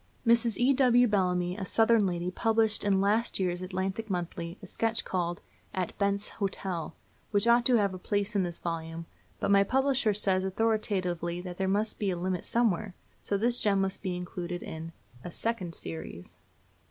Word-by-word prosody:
Mrs. 235 -1 +3
E.W. 250 -1 +4
Bellamy, 180 -3 +1
a 200 - -4
Southern 225 +1 +3
lady, 175 0 -2
published 220 +1 +2
in 200 -2 +3
last 210 +4 +1
year's 180 -1 -1
Atlantic 190 +4 -3
Monthly 175 -1 -4
a - - -10
sketch 225 +4 -1
called 175 -2 -2 0.3
"At 185 -2 -2
Bent's 200 0 +1
Hotel," 190 -4 -3 0.3
which 205 0 +2
ought 235 0 +5
to 250 - +4
have 200 -4 +2
a 185 - -7
place 205 +2 -1
in 200 - +3
this 175 -2 -3
volume; 165 -1 -4 0.3
but - - 0
my 200 0 +6
publisher 260 -2 +1
says 190 -2 +2
authoritatively 190 -4 -1
that 180 -1 -7
there 190 - +1
must 210 +3 0
be 205 - 0
a 180 - -1
limit 180 0 -2
somewhere; 215 -4 0 0.3
so 200 - -1
this 240 +4 +3
gem 200 -2 +2
must 195 0 -1
be 185 -3 -2
included 180 0 -5
in 160 +1 -7 0.3
a 175 - -6
second 185 -5 -2
series! 80 +1 -8
195 Hz, 175 wpm, -29 LUFS, 180-220 Hz, 0.3 s, my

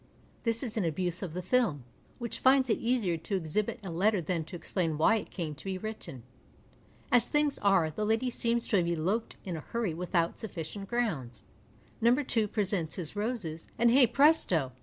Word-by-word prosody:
This 230 +1 0
is 230 -3 -4
an 210 - +1
abuse 175 +2 -2
of 175 -4 -5
the 180 - -3
film, 200 - +1 0.3
which 235 -2 -5
finds 260 -2 +4
it - - +1
easier 230 -8 +1
to 165 +5 -4
exhibit 190 +7 -1
a 180 - -4
letter 200 +5 +2
than 170 0 -2
to 180 - -9
explain 165 -2 -2
why 220 +9 +4
it - - -6
came 165 -5 -4
to 150 - -14
be 190 -1 -2
written. 200 - -6 0.9
As 245 - +4
things 295 -1 +1
are, 195 -6 +3
the 210 - -3
lady 225 +4 +1
seems 235 0 0
to 205 - +3
have 175 -2 +2
eloped 175 +7 -1
in 180 -3 -3
a - - -4
hurry 225 -1 -2
withovit 170 0 -1
sufficient 195 0 -6
grounds. 135 - -2 0.6
No. 235 +2 +5
2 250 -6 0
presents 195 -6 0
his 175 0 -5
roses, 205 -7 -3
and, 235 0 +4
hey 255 0 +6
presto 240 - +4
200 Hz, 190 wpm, -30 LUFS, 165-235 Hz, 0.9 s, hey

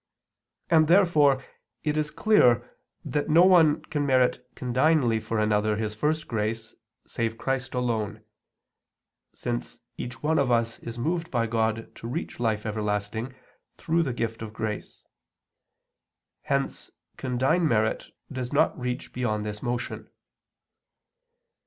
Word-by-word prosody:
And 160 -2 +5
therefore 155 -7 +4 0.4
it 150 -1 0
is 155 -1 0
clear 150 - +4 0.4
that 145 +1 -1
no 165 +3 +7
one 170 -5 +5
can 150 -2 -2
merit 130 -2 +2
condignly 125 -1 +2
for 115 +1 -3
another 105 0 +2
his 105 0 -2
first 150 +7 -1
grace, 110 0 -2 0.3
save 115 -1 -2
Christ 135 0 -2
alone; 115 -4 -1 1.1
since - - -4 0.2
each 125 +3 -7
one 160 +1 +2
of 135 -3 +2
us 115 -1 +1
is 115 0 -7
moved 165 +6 -1
by 115 -3 +1
God 115 0 -1
to 115 - -7
reach 140 +3 -5
life 110 -3 0
everlasting 105 +3 -2 0.4
through 165 +1 +1
the 140 -6 0
gift 115 -2 -3
of 110 -1 -6
grace; 110 -1 -5 1.4
hence 140 0 -1 0.3
condign 130 +7 +1
merit 110 -4 +1 0.2
does 130 -2 -4
not - - +3
reach 125 0 -4
beyond 110 -4 -1
this 105 0 -5
motion. 120 0 -4
125 Hz, 125 wpm, -26 LUFS, 110-150 Hz, 1.4 s, no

